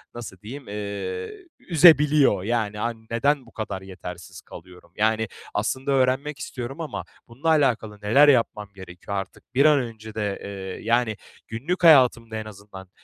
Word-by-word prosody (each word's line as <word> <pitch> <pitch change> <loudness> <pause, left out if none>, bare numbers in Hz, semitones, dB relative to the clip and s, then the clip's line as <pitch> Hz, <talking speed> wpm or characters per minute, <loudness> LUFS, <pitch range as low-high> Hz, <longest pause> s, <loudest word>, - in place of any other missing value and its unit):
nasıl 110 -6 -8
diyeyim, 130 +6 -9
eee, 100 -3 -5 0.3
üzebiliyor. 150 - +5
Yani, 110 -1 -1
hani 115 +1 -4
neden 135 +4 +1
bu 115 - -18
kadar 100 -4 -5
yetersiz 90 -2 -9
kalıyorum? 90 -2 -14
Yani, 110 +1 +1 0.3
aslında 130 +6 -1
öğrenmek 135 +2 +1
istiyorum 130 +5 -6
ama 160 - -5 0.2
bununla 130 +7 -6
alakalı 120 -9 +1
neler 135 +9 +5
yapmam 115 -6 +2
gerekiyor 95 +1 -7
artık? 95 +5 -8
Bir 140 +3 +5
an 150 -2 +6
önce 110 -3 -7
de, 105 -2 -2
eee, 95 0 -7
yani, 115 -1 +2 0.3
günlük 150 +12 -3
hayatımda 130 -7 +6
en 110 - -5
azından, 100 -2 -12
115 Hz, 145 wpm, -24 LUFS, 100-135 Hz, 0.3 s, an